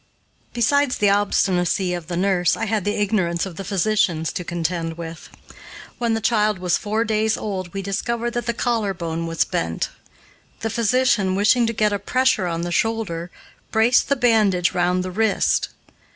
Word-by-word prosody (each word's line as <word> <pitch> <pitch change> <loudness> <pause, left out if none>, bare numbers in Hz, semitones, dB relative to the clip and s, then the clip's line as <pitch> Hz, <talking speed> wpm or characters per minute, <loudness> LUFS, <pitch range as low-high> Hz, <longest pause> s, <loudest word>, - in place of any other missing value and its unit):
Besides 280 +3 +2
the 205 -1 +3
obstinacy 190 -2 +1
of 175 -3 -5
the 175 -1 -3
nurse, 185 -1 +2
I - - -2
had 210 -3 -1
the 205 - 0
ignorance 190 -5 0
of 180 -4 -9
physicians 190 -5 +1
to 180 - -4
contend 170 -1 -3
with. 165 -1 -8 0.7
When 235 -2 +1
the - - -1
child 215 -3 +2
was 180 -1 0
four 215 +2 -1
days 220 0 +1
old 185 -4 -4
we 195 +1 -5
discovered 235 +4 -2
that 240 -1 -4
the 235 - +1
collar 225 -5 0
bone 165 -1 -4
was 165 -1 +1
bent. 85 0 -2 0.7
The 225 - -2
physician, 230 -4 +2
wishing 225 +4 +3
to - - 0
get 210 -1 +1
a 200 - -1
pressure 255 -2 +1
on 165 -1 -2
the 175 0 -3
shoulder, 190 -5 -1 0.4
braced 225 +3 +3
the 280 - +3
bandage 215 -8 +2
round 180 +1 +1
the 185 - -5
wrist. 215 +2 +1
200 Hz, 170 wpm, -22 LUFS, 175-225 Hz, 0.7 s, the